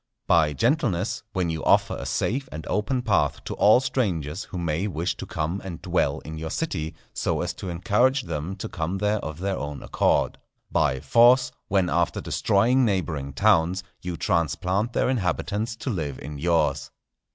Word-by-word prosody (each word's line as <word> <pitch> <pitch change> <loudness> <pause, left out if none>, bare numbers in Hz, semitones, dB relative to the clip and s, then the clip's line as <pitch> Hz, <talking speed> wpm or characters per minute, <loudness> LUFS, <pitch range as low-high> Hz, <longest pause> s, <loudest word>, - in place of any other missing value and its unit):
By 80 -3 +4
gentleness, 115 - 0
when 90 -4 0
you 80 -1 -4
offer - - +3
a - - -5
safe 130 +4 -1
and 80 0 -7
open 125 +5 -1
path 110 -5 +1
to - - -5
all 105 +4 +6
strangers 95 - -1
who 95 - -7
may 85 +2 -1
wish 90 0 -2
to - - -7
come 80 +5 -2
and 90 -4 -6
dwell - - 0
in 80 0 -7
your 80 0 -4
city, 80 - -3 0.2
so - - -1
as - - -2
to 95 - -7
encourage 110 +10 +2
them 85 +2 -4
to 95 - -5
come 85 +3 -3
there 105 +2 +1
of 80 -4 -6
their 95 +2 -2
own 75 -1 -5
accord; - - +1 0.3
by 65 - +1
force, 120 - +5 0.2
when 95 -2 +2
after 85 +1 +1
destroying 120 +7 +2
neighbouring 85 - -1
towns, 95 +1 +3 0.2
you 90 -2 -4
transplant 95 - 0
their - - +1
inhabitants 110 -1 -1
to 125 +3 -4
live 75 - -3
in 75 -1 -7
yours. 75 -5 +1
90 Hz, 175 wpm, -25 LUFS, 80-105 Hz, 0.3 s, all